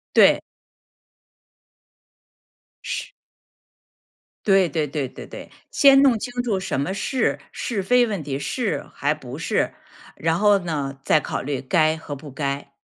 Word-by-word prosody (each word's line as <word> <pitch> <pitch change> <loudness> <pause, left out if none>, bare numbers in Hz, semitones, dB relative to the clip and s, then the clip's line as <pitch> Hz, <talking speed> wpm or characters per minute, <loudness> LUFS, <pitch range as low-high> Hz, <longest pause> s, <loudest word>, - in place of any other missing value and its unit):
对。 - - +7 2.5
是。 - - -4 1.3
对 195 -4 +4
对 155 -3 -1
对 140 -1 -2
对 - - -11
对， - - -10 0.2
先 275 -1 +6
弄 260 -5 +5
清 245 +3 -3
楚 205 -6 0
什 185 - -2
么 145 +7 -1
是？ 255 +6 0
是 205 -6 -3
非 245 +4 +4
问 200 -8 -3
题， 135 -1 -3
是 230 - -2
还 145 +2 0
不 135 -3 -9
是？ - - 0 0.4
然 165 +1 0
后 205 -1 +5
呢， 145 -6 -3
再 155 - +4
考 - - -4
虑 140 -1 -3
该 155 +3 +2
和 145 -2 -7
不 140 0 -10
该。 140 0 -3
160 Hz, 150 characters per minute, -23 LUFS, 140-205 Hz, 2.5 s, 对